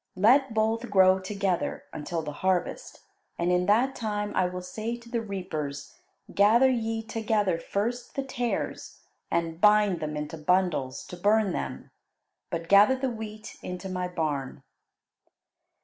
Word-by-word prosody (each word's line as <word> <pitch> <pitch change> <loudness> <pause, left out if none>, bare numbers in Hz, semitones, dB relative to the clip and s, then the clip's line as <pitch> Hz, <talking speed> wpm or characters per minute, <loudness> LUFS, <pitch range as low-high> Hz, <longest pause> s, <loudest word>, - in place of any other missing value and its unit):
Let 245 +5 +4
both 225 +2 0
grow 190 -1 +5
together 190 -2 -2
until 160 +2 -4
the 150 - -4
harvest, 185 - -1 0.4
and 170 +1 +1
in 180 0 +2
that 240 +6 +3
time 210 -3 -3
I 185 - +3
will 180 0 -6
say 215 +6 -4
to 235 0 -16
the 235 -1 -2
reapers, 180 -9 -5 0.4
'Gather 230 +6 +5
ye 225 -2 -1
together 215 -6 0
first 235 +8 -3
the 275 - -1
tares 245 -3 -4 0.3
and 165 0 -1
bind 210 -4 +5
them 155 -1 -4
into 150 +2 -5
bundles 155 -6 0
to - - -8
burn 205 +1 +2
them, - - -5 0.6
but 170 -1 -4
gather 205 +7 +6
the 260 -1 -2
wheat 215 -1 -8
into 180 +1 -6
my 180 -1 -2
barn.'" 155 -6 -3
200 Hz, 145 wpm, -27 LUFS, 180-225 Hz, 0.6 s, gather